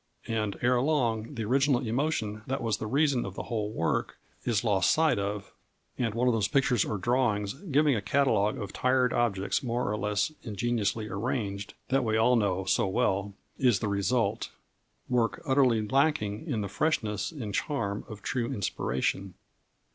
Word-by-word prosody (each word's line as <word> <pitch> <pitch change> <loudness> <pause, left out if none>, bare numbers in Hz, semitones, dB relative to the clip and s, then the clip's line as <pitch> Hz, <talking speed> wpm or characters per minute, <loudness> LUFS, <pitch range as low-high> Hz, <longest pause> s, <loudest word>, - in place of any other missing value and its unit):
And 110 -3 -1
ere 125 0 +3
long 125 -4 0
the 115 -2 -3
original 135 +1 +2
emotion 110 -4 -1
that 135 0 -2
was 110 -3 0
the 110 - -4
reason 140 0 +2
of 95 -1 -6
the - - -4
whole 105 -3 -2
work 85 -7 -1 0.3
is 115 -4 +1
lost 100 -6 +3
sight 160 -8 +3
of, 100 0 -4 0.4
and 115 -4 -1
one 125 +2 +1
of 125 - +4
those 110 -3 +1
pictures 125 -4 +2
or 105 - -2
drawings 105 -2 +1
giving 150 -3 +2
a 105 - -1
catalogue 105 -2 +2
of 100 - -6
tired 130 -1 +2
objects 100 -5 0
more 120 -1 -1
or 105 - 0
less 105 +4 0
ingeniously 110 -1 -1
arranged 100 -1 -3
(that 135 0 +2
we 110 -1 +1
all 125 +3 +4
know 95 -4 +1
so 95 - +2
well) 100 -2 0 0.2
is 125 -6 +4
the 105 - -2
result 105 +4 0 0.6
work 115 -5 +1
utterly 125 -5 +3
lacking 135 -2 +1
in 120 -8 -1
the 100 - -2
freshness 110 - -1
and 120 -10 -6
charm 100 -6 -2
of 110 -4 -10
true 125 0 -1
inspiration. 95 - -2
115 Hz, 170 wpm, -29 LUFS, 100-130 Hz, 0.6 s, of